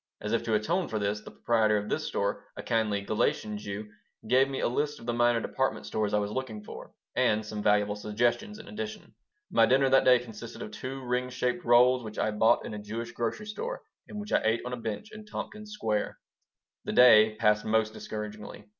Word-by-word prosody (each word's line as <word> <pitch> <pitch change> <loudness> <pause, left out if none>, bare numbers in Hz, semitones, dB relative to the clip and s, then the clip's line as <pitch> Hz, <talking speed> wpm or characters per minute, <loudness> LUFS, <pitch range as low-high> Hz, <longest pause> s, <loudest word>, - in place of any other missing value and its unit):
As 105 +1 -3
if 115 - +2
to 110 -2 +1
atone 170 - 0
for 110 - -3
this, 105 0 -1
the - - -11
proprietor 110 -2 +2
of 105 0 -3
this - - -2
store, - - -1
a - - -6
kindly 105 -3 0
Galician 105 +1 0
Jew, 105 +1 -6 0.4
gave 130 +3 +4
me 135 - -3
a - - +1
list 145 +4 -1
of - - -12
the 120 - -1
minor 120 0 +3
department - - -2
stores 105 -1 -1
I - - +2
was 105 0 -1
looking 110 -4 -4
for, - - -10 0.2
and 105 0 +2
some 105 0 -5
valuable 105 0 +2
suggestions 120 - -1
in 220 - -12
addition 215 0 -7 0.4
My - - +5
dinner 135 +1 +3
that 135 - +6
day 125 -1 +7
consisted 115 -1 -8
of 105 - -8
two 130 +4 -6
ring 125 +1 -1
shaped 125 -1 -1
rolls 125 +1 +5
which 110 -1 -8
I 110 - +1
bought 110 +2 +3
in - - -6
a 105 - -5
Jewish 115 +3 -5
grocery 120 - -3
store 470 - -5 0.2
and 210 - -7
which 205 0 -7
I - - +4
ate 110 +1 +2
on 125 - -4
a - - -3
bench 115 - -5
in 215 0 -10
Tompkins 210 0 -7
Square 110 - -2 0.7
The - - -3
day 110 -3 +7
passed 105 0 +3
most 110 0 +1
discouragingly. 105 -1 -7
115 Hz, 215 wpm, -29 LUFS, 105-130 Hz, 0.7 s, day